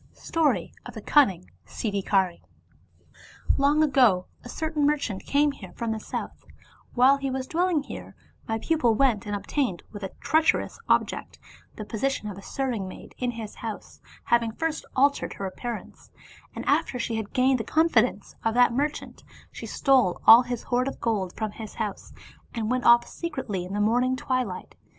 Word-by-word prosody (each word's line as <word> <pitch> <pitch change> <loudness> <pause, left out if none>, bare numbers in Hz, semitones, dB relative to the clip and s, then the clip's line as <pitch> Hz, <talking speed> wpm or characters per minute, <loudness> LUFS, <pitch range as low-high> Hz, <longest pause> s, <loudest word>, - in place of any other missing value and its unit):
STORY 325 -3 0
OF - - -10
THE - - -6
CUNNING 190 - +3 0.2
SIDDHIKARf 195 -4 0 0.6
" - - -5
Long 290 +3 +4
ago 250 -11 +4 0.2
a 245 - -10
certain 315 0 -2
merchant 280 -10 -2
came 290 +1 +3
here - - -11
from 230 -2 -3
the 220 -1 -4
north; - - -5 0.5
while 260 +3 +6
he 275 -1 -3
was 260 0 -3
dwelling 340 0 +1
here, - - -9 0.3
my 225 - -1
pupil 240 -2 +1
went 225 -5 +2
and 205 - -2
obtained, 205 - -2
with 205 - -8
a 195 - -4
treacherous 320 +7 +1
object, - - 0 0.4
the 215 - -7
position 230 +1 -2
of 205 - -5
a 200 - -10
serving 235 -3 -3
maid 185 - -11
in 250 - 0
his 225 -3 -6
house, 225 -2 -8 0.2
having 235 -1 +2
first 325 +4 -3
altered 280 +2 +2
her 195 - -5
appearance, 230 +4 -7 0.5
and - - -6
after 255 - +1
she 230 -1 -2
had 215 -2 -5
gained 255 0 +3
the - - -2
confidence 245 -11 +2
of 225 0 0
that 245 -1 +5
merchant, 290 +4 -3 0.3
she - - -8
stole 260 -10 +2
all 230 +2 +10
his 245 -2 -4
hoard 250 +1 0
of 275 - -5
gold 205 -6 -1
from 215 -2 -3
his 215 0 -9
house, 215 -3 -5 0.4
and 225 0 -2
went 255 0 0
off 235 0 +6
secretly 250 - -4
in 185 - -7
the 205 - -1
morning 245 +5 +2
twilight. 255 -7 -3
240 Hz, 175 wpm, -26 LUFS, 210-275 Hz, 0.6 s, all